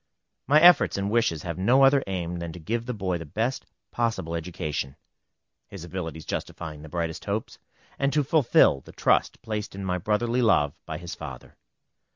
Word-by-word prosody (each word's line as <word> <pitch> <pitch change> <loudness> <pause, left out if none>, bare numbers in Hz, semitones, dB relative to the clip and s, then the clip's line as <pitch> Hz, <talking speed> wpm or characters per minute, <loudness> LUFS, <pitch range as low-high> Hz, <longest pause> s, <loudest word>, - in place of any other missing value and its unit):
My 150 +2 +6
efforts 175 - +6
and 100 +1 -1
wishes 110 -9 +1
have 85 0 -5
no 125 +8 +4
other 135 0 +5
aim 90 -2 -3
than 85 -1 -5
to 90 - -9
give 115 +8 -3
the 125 - -2
boy 95 -4 -2
the - - -6
best 115 - -2 0.2
possible 110 -8 -1
education, 80 -5 -4 0.7
his 95 -4 -9
abilities 80 -3 -6
justifying 75 -3 -5
the 80 - -10
brightest 85 0 -3
hopes, 105 +2 -3 0.4
and 140 0 +2
to 150 0 +2
fulfil 130 - +4
the - - -14
trust - - +1
placed 105 -2 -4
in 100 0 -5
my 90 -1 -1
brotherly 115 +6 0
love 85 - +3
by - - -4
his 85 -1 -7
father. - - -9
95 Hz, 180 wpm, -26 LUFS, 85-115 Hz, 0.7 s, My